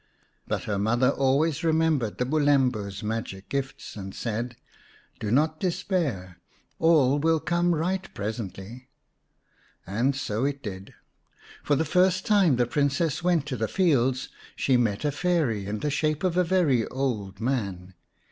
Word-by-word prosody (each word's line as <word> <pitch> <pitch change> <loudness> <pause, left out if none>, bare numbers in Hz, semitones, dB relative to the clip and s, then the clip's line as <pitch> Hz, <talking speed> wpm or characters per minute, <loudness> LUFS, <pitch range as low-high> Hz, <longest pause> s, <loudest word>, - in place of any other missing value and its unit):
But - - -2
her 100 -2 -2
mother 120 +5 +2
always 145 +4 +1
remembered 160 -8 +1
the 125 - 0
Bulembu's 130 -8 +1
magic 105 -3 -4
gifts, 135 -1 -4
and 95 -2 -7
said, 120 +1 -3 0.3
" - - -30
Do 105 - -3
not 155 +6 +2
despair; 170 - -2 0.4
all 145 -4 +4
will 160 +1 +2
come 175 +1 +1
right 185 +4 -2
presently." 110 +3 -6 1.0
And 120 +8 0
so 130 -4 -2
it 140 0 -2
did; 95 -3 -7 0.7
for 145 - +2
the 160 +3 0
first 185 +3 +2
time 200 - +4
the 120 0 +2
Princess 145 +6 0
went 175 -5 +2
to 145 -4 -3
the 110 0 -1
fields 135 - +1 0.3
she 130 - +2
met 115 0 +1
a 145 - +2
Fairy 145 - 0
in 105 +1 -3
the 150 - -1
shape 155 +2 0
of 180 -2 +1
a 180 - +4
very 165 -10 +2
old 115 -8 -3
man. 100 -7 -2
135 Hz, 150 wpm, -26 LUFS, 110-160 Hz, 1.0 s, all